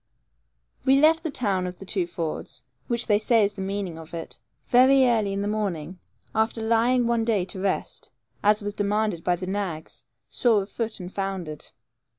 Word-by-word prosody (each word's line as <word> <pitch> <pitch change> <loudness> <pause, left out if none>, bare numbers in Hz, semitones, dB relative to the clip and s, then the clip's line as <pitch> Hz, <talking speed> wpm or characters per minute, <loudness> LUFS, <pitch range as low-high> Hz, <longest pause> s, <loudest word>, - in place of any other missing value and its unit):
We 270 +1 +5
left 320 +2 +5
the 325 - -3
town 200 -9 0
of 180 0 -7
the 195 - -10
two 185 -2 -1
fords, 160 -6 -5 0.2
which 235 -1 0
they 210 -2 +3
say 225 0 +3
is 200 - -2
the 195 - -7
meaning 190 -4 -3
of 160 +1 -9
it, 165 - -7 0.3
very 260 +2 +6
early 220 -5 +2
in 200 0 -2
the - - -1
morning, 185 -5 -3 0.3
after 220 +1 0
lying 235 +2 +3
one 235 -1 +1
day 215 -5 +1
to 190 +1 -6
rest, 195 0 -2 0.3
as 210 0 +3
was 205 0 -3
demanded 205 -3 0
by 180 - +2
the 185 +1 -6
nags, 185 -5 -4 0.2
sore 225 -5 +2
of 195 - -13
foot 225 -2 -3
and 180 0 -8
foundered. 190 -6 -4
205 Hz, 185 wpm, -25 LUFS, 185-230 Hz, 0.3 s, very